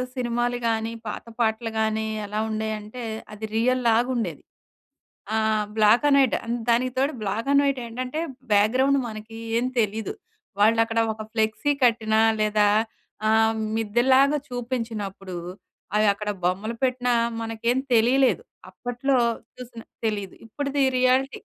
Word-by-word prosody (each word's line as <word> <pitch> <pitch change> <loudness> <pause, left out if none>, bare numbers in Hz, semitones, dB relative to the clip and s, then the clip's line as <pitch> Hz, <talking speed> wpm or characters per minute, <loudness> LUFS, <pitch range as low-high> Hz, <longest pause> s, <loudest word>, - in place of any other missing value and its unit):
సినిమాలు 240 -1 -1
కానీ, 225 0 0 0.2
పాత 210 - -5
పాటలు 225 0 0
కానీ, 220 0 0 0.2
ఎలా 210 +1 -3
ఉండేయంటే, 220 +2 -4 0.3
అది 210 +1 -6
రియల్లాగా 240 0 +2
ఉండేది. 235 - -3 0.9
ఆహ్ 220 -1 +1
బ్లాక్ 215 +4 +5
అండ్ 280 -1 +5
వైట్. 265 -3 +3
ఆహ్, 235 +1 -2
దానికి 245 +2 +2
తోడు, 275 +4 +1
బ్లాక్ 210 +5 -2
అండ్ 280 0 +5
వైట్ 275 -2 0
ఏంటంటే, 255 +5 -4 0.3
బ్యాక్‌గ్రౌండ్ 255 +7 +3
మనకి 215 +1 -9 0.2
ఏం 245 - -1
తెలీదు. 220 - -1 0.5
వాళ్ళు 225 +2 +5
అక్కడ 230 0 -1
ఒక 215 0 -7
ఫ్లెక్సీ 220 +6 +1
కట్టినా 220 -2 +2 0.2
లేదా 210 -1 +3 0.6
ఆహ్, 220 0 +4 0.2
మిద్దెలాగా 260 +6 +3
చూపించినప్పుడు, 225 -6 -4 0.6
అవి 215 0 +4
అక్కడ 210 +1 -5
బొమ్మలు 195 +6 -1
పెట్టినా 250 -1 +1 0.3
మనకేం 225 +2 -1 0.2
తెలియలేదు. 250 - +4 0.3
అప్పట్లో 255 +2 -1 0.4
చూసిన 240 -2 -10 0.2
తెలీదు. 205 -4 -2
ఇప్పటిది 280 +5 -2 0.2
రియాలిటీ 255 +2 +2
230 Hz, 125 wpm, -24 LUFS, 215-250 Hz, 0.9 s, బ్లాక్